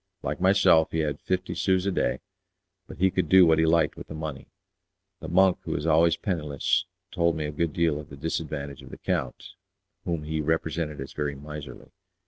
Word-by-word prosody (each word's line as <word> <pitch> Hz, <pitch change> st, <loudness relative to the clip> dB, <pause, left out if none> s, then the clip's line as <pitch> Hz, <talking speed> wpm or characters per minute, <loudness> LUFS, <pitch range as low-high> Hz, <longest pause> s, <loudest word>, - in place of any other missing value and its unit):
Like 75 Hz, +3 st, -3 dB
myself 95 Hz, -4 st, +5 dB
he 80 Hz, -, -1 dB
had 75 Hz, -2 st, -2 dB
fifty 90 Hz, 0 st, -2 dB
sous 95 Hz, -1 st, +1 dB
a 100 Hz, -, +1 dB
day, -, -, -1 dB, 0.7 s
but -, -, -10 dB
he 95 Hz, +1 st, +3 dB
could 95 Hz, -, -1 dB
do 95 Hz, -1 st, +8 dB
what 80 Hz, -1 st, +4 dB
he 80 Hz, -, +3 dB
liked 80 Hz, -1 st, +3 dB
with -, -, -10 dB
the 80 Hz, -, -8 dB
money. 75 Hz, -3 st, -6 dB, 0.7 s
The -, -, -7 dB
monk, 95 Hz, -1 st, +4 dB
who -, -, -4 dB
was 75 Hz, -, -3 dB
always 80 Hz, +1 st, +4 dB
penniless, 75 Hz, -8 st, -1 dB, 0.3 s
told 85 Hz, -1 st, +1 dB
me 80 Hz, -1 st, -3 dB
a 75 Hz, -, -3 dB
good 80 Hz, +2 st, -1 dB
deal 80 Hz, -2 st, +1 dB
to -, -, -18 dB
the 70 Hz, -, -10 dB
disadvantage 70 Hz, -2 st, -4 dB
of 65 Hz, -, -12 dB
the -, -, -10 dB
count, -, -, -3 dB, 0.5 s
whom 85 Hz, -3 st, -2 dB
he 80 Hz, +1 st, -2 dB
represented 80 Hz, -1 st, -1 dB
as 70 Hz, -, -8 dB
very 75 Hz, -1 st, -2 dB
miserly. 75 Hz, 0 st, -9 dB
80 Hz, 200 wpm, -26 LUFS, 75-85 Hz, 0.7 s, do